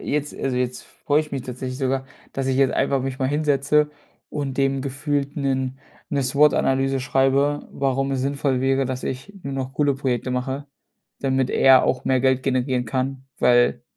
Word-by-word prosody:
jetzt 150 0 -2
also, 130 -2 -2
jetzt 125 0 -2
freue 145 +1 0
ich 155 -1 -7
mich 135 -2 -3
tatsächlich 130 +1 -5
sogar, 135 -1 -1 0.3
dass 135 -1 -2
ich 130 -1 +1
jetzt 135 -1 +3
einfach 135 -1 +1
mich 135 0 -4
mal 130 -2 0
hinsetze 150 0 +2 0.4
und 140 -3 -3
dem 135 0 +1
gefühlt 140 +1 -2
'nen 130 -2 -1 0.3
'ne 140 -2 0
SWOT-Analyse 135 -1 +2
schreibe, 135 +2 +1
warum 135 0 -1
es 130 - -1
sinnvoll 135 -1 0
wäre, 135 0 +2
dass 130 0 -4
ich 135 +11 -5
nur 140 - -5
noch 135 0 -4
coole 145 -2 +2
Projekte 130 -2 -2
mache, 130 +3 -3 0.5
damit 135 -1 +1
er 135 -1 +6
auch 125 0 -1
mehr 130 -1 +3
Geld 130 0 +2
generieren 130 -2 0
kann, 130 +2 -2
weil 120 0 +3
135 Hz, 175 wpm, -23 LUFS, 130-140 Hz, 0.5 s, er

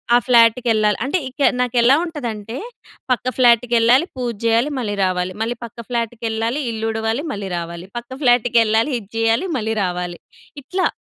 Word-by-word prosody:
ఆ - - +8
ఫ్లాట్‌కెళ్ళాలి. 230 -3 +4
అంటే 285 +8 0
ఇక 260 +2 -9 0.2
నాకెలా 245 +1 +4
ఉంటదంటే 235 -9 -6 0.6
పక్క 250 - 0
ఫ్లాట్‌కెళ్ళాలి, 240 +2 +4
పూజ 245 -2 -2
చేయాలి, 230 +5 +3
మళ్ళీ 215 -5 -2
రావాలి. 185 0 -1
మళ్ళీ 230 +2 -1
పక్క 230 - -14
ఫ్లాట్‌కెళ్ళాలి, 230 +2 -2
ఇల్లు 225 0 -3
ఉడవాలి, 225 +4 -2
మళ్ళీ 200 -4 -5
రావాలి, 170 +1 -6
పక్క 240 +1 -8
ఫ్లాట్‌కెళ్ళాలి 235 0 +3
ఇది 200 -3 -16
చేయాలి, 225 +9 +1
మళ్ళీ 220 -1 -2
రావాలి. 180 -1 -3 0.4
ఇట్లా. 365 +8 0
230 Hz, 140 wpm, -20 LUFS, 220-245 Hz, 0.6 s, ఆ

